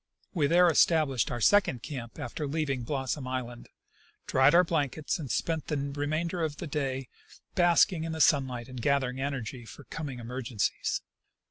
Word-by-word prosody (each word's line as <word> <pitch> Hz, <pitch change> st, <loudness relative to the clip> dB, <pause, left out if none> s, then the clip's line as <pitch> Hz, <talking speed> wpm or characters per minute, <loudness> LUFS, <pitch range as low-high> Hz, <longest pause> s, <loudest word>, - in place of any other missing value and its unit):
We 155 Hz, -6 st, +2 dB
there 175 Hz, +3 st, +5 dB
established 155 Hz, -7 st, +3 dB
our 120 Hz, -, -3 dB
second 155 Hz, -, +3 dB
camp 120 Hz, -6 st, -7 dB
after 145 Hz, +5 st, -4 dB
leaving 140 Hz, -3 st, -1 dB
Blossom 135 Hz, +1 st, -3 dB
island, 120 Hz, -2 st, -5 dB, 0.6 s
dried 135 Hz, +4 st, +4 dB
our 180 Hz, -, +7 dB
blankets, 155 Hz, -2 st, -1 dB
and 145 Hz, -5 st, -6 dB
spent 160 Hz, +7 st, -1 dB
the 150 Hz, -, -1 dB
remainder 145 Hz, +5 st, -2 dB
of 155 Hz, -2 st, -2 dB
the -, -, -5 dB
day 135 Hz, -3 st, -2 dB, 0.5 s
basking 175 Hz, -1 st, +4 dB
in 165 Hz, -, -3 dB
the 160 Hz, -, -4 dB
sunlight 130 Hz, -5 st, +2 dB
and 130 Hz, -2 st, -7 dB
gathering 135 Hz, -1 st, +1 dB
energy 130 Hz, -3 st, -4 dB
for 130 Hz, +5 st, -12 dB
coming 140 Hz, -3 st, -6 dB
emergencies. 120 Hz, -2 st, -2 dB
140 Hz, 155 wpm, -29 LUFS, 130-160 Hz, 0.6 s, our